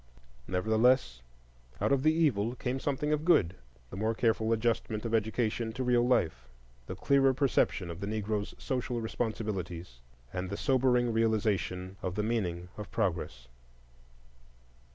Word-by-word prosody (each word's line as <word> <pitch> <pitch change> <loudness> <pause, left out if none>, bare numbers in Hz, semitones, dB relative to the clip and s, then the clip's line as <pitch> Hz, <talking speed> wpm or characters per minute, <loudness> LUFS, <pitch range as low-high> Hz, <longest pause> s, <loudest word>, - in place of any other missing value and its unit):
Nevertheless, 110 - +2 0.6
out - - +1
of 140 -1 +3
the 155 +3 +4
evil 125 -8 +1
came 130 +1 -2
something 145 +2 -1
of 150 0 -1
good,—the 65 - 0
more 110 +3 0
careful 110 -1 +1
adjustment 115 -1 0
of 115 - -3
education 110 +1 0
to 130 - -3
real 120 -1 +3
life, 80 - +1 0.4
the 95 - -5
clearer 135 +4 +3
perception 120 -9 +1
of 85 - -8
the 100 - -4
Negroes' 105 -1 -2
social 125 -3 -2
responsibilities, 100 - -4 0.3
and 90 0 -3
the 100 - -4
sobering 125 -3 +2
realization 105 -4 0
of 90 -1 -3
the 105 - 0
meaning 90 -6 -2
of 105 - -7
progress. 70 -9 -2
110 Hz, 135 wpm, -30 LUFS, 95-125 Hz, 0.6 s, the